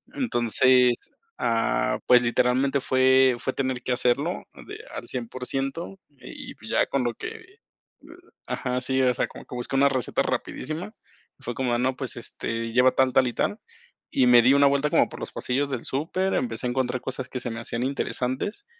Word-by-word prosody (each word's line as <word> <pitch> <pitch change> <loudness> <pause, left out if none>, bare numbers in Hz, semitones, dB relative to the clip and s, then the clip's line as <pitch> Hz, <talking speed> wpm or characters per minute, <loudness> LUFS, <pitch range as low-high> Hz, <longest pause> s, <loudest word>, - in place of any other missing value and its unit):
Entonces, 125 - +2 0.3
ah, 115 -1 +1
pues, 125 -1 +7
literalmente 125 +3 +2
fue 130 -1 +4
fue 130 - -2
tener 130 -2 -2
que 125 - 0
hacerlo 135 +8 0 0.2
de - - -7 0.2
al - - -7
100% 135 +8 -4
y, 140 -3 -11
pues, - - -11
ya - - +3
con 135 -2 0
lo 120 -1 -1
que, - - -6
eh, 380 +4 -12 0.9
ajá, 125 0 -2
sí, 130 +1 +1
o 125 -1 +3
sea, - - -1
como - - -12
que - - -9
busqué 125 +2 -4
una 140 +1 +5
receta 130 -4 0
rapidísima, 160 - -4 0.5
fue 120 -2 -5
como 125 -2 0
no, 130 +1 0
pues, 130 -2 -5
este, 115 0 -4
lleva 125 +1 +5
tal, 130 -1 +2
tal 130 - +4
y 120 - -3
tal, - - -1 0.5
y 130 - +3
me 120 -1 +8
di 130 +4 +5
una 140 0 +5
vuelta 140 +2 +2
como - - +4
por - - -9
los - - -5
pasillos 140 +3 -1
del 130 - -4
súper, 175 +7 -1
empecé 245 - -2
a - - -1
encontrar 130 0 -1
cosas 130 -1 -3
que 125 - -4
se 120 - -4
me 115 - -5
hacían 120 +1 -3
interesantes, 135 - -2
130 Hz, 190 wpm, -25 LUFS, 125-140 Hz, 0.9 s, me